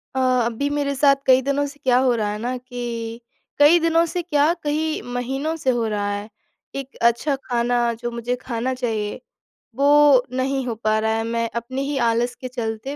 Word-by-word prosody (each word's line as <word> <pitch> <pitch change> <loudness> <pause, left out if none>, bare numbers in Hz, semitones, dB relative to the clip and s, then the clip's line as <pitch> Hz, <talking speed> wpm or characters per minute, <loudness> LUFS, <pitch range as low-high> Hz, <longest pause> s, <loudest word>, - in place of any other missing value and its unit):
अ, - - 0 0.3
अभी 240 +5 -1
मेरे 290 -1 -1
साथ 275 0 +5
कई 260 0 +5
दिनों 280 +2 0
से 285 +1 -12
क्या 250 -1 +4
हो 260 -2 +3
रहा 215 -2 -1
है 210 - -4
ना 245 +3 -2
कि, 240 -2 -6 0.4
कई 300 +4 +7
दिनों 330 0 +3
से 350 +2 -3
क्या, 305 -1 +2
कई 310 +1 -1
महीनों 270 +6 -2
से 265 - +2
हो 240 -3 +1
रहा 205 -1 -1
है, 205 +1 -5 0.5
एक 275 -1 -6
अच्छा 235 +5 +2
खाना 240 -1 0
जो 240 0 -4
मुझे 235 +1 -2
खाना 245 +1 -3
चाहिए 225 -4 -3 0.6
वो 285 -1 +5
नहीं 265 +1 -1
हो 230 - -2
पा 215 0 +2
रहा 220 0 0
है, 225 - -1
मैं 230 0 -1
अपने 250 +3 -3
ही 280 0 -2
आलस 235 +2 0
के 255 - -4
चलते 240 +2 -4
250 Hz, 195 wpm, -22 LUFS, 235-280 Hz, 0.6 s, कई